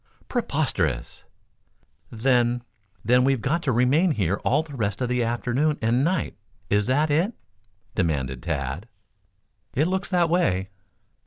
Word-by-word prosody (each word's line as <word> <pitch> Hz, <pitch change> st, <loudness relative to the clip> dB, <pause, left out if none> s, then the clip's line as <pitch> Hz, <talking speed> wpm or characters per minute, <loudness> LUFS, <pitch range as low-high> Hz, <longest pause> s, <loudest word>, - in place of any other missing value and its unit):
"Preposterous." 130 Hz, -, -1 dB, 0.8 s
"Then, 120 Hz, 0 st, +1 dB, 0.4 s
then, 125 Hz, +3 st, +4 dB
we've 135 Hz, -1 st, +2 dB
got 150 Hz, +9 st, 0 dB
to 140 Hz, -, 0 dB
remain 130 Hz, +9 st, +3 dB
here 100 Hz, -, 0 dB
all 155 Hz, -, +1 dB
the 150 Hz, -3 st, -10 dB
rest 105 Hz, -5 st, -1 dB
of 125 Hz, -1 st, -1 dB
the 125 Hz, -1 st, +1 dB
afternoon 125 Hz, +6 st, 0 dB
and 120 Hz, +4 st, +2 dB
night 170 Hz, -1 st, 0 dB, 0.4 s
is 105 Hz, +1 st, +2 dB
that 145 Hz, +4 st, +2 dB
it?" 175 Hz, +10 st, +2 dB, 0.6 s
demanded 65 Hz, -7 st, -1 dB
Tad. 75 Hz, -, -3 dB, 0.9 s
"It 150 Hz, -, +3 dB
looks 190 Hz, +1 st, -1 dB
that 175 Hz, -3 st, +3 dB
way." 95 Hz, -, +1 dB
125 Hz, 135 wpm, -25 LUFS, 100-150 Hz, 0.9 s, then